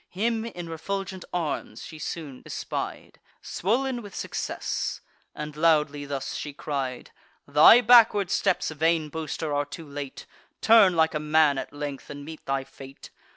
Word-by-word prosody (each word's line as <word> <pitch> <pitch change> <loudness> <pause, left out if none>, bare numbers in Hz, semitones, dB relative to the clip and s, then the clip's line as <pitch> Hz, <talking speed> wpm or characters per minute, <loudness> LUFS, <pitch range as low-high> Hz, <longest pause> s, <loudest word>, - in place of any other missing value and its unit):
Him 225 +4 -1
in 175 -7 -7
refulgent 190 +3 -4
arms 165 -4 -3
she 155 - -10
soon 150 -4 -6
espied, - - -5 0.2
Swoln 245 +6 -1
with 205 -3 -11
success; - - -3 0.3
and 150 0 -6
loudly 150 -2 +2
thus 140 -2 -4
she 145 - -5
cried: 135 -3 -4 0.4
"Thy 150 +12 +8
backward 220 -5 +6
steps, - - +1
vain 160 0 +1
boaster, 155 0 -4
are 145 0 +1
too 155 +2 -9
late; 140 -1 -7 0.3
Turn 215 -5 +6
like 160 -1 +3
a 150 - -1
man, 150 -2 +3
at - - -6
length, 145 -2 -6
and 145 0 -8
meet 160 0 -9
thy 135 0 0
fate. 135 0 -13
155 Hz, 150 wpm, -26 LUFS, 145-185 Hz, 0.4 s, Thy